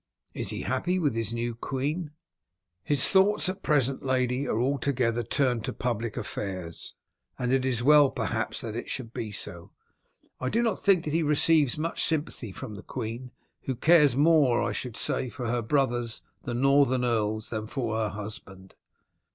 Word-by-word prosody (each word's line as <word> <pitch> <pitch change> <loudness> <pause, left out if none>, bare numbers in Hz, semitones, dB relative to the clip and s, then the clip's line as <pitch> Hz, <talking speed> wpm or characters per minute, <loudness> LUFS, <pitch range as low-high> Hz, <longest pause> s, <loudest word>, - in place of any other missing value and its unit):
Is - - -2
he - - -3
happy 180 +1 0
with 150 -8 +1
his 115 -1 -2
new 120 0 -2
queen?" 145 +7 -3 0.7
"His 145 -3 +3
thoughts 195 +1 +4
at 190 +1 -5
present, 135 -3 +1
lady, 130 0 0
are 110 - 0
altogether 125 -2 0
turned 125 -1 0
to - - -3
public 115 -2 -3
affairs, 95 -5 -5 0.4
and 125 0 0
it 135 -1 +2
is 120 -3 0
well 145 0 +7
perhaps 115 -2 -2
that 110 -2 -5
it 120 - -5
should 120 -3 -5
be 110 -2 -4
so. 90 -4 -6 0.7
I 130 - -1
do 235 +2 +1
not 225 -5 0
think 190 -4 +3
that 150 - -3
he 165 - +2
receives 150 -2 +3
much 165 +2 -1
sympathy 150 -8 -1
from 110 +3 -8
the 105 - -8
queen, 115 +5 -5 0.4
who 130 - -1
cares 150 -1 +5
more, 145 -5 +4
I - - -1
should 125 -3 -5
say, 130 - -1
for 125 0 -6
her 120 +1 0
brothers, 120 -2 0 0.2
the 120 - -3
northern 135 -1 +3
earls, 110 -2 -1
than 110 -1 -3
for 115 -3 -2
her 110 -1 0
husband." 100 -2 -9
125 Hz, 175 wpm, -27 LUFS, 115-145 Hz, 0.7 s, well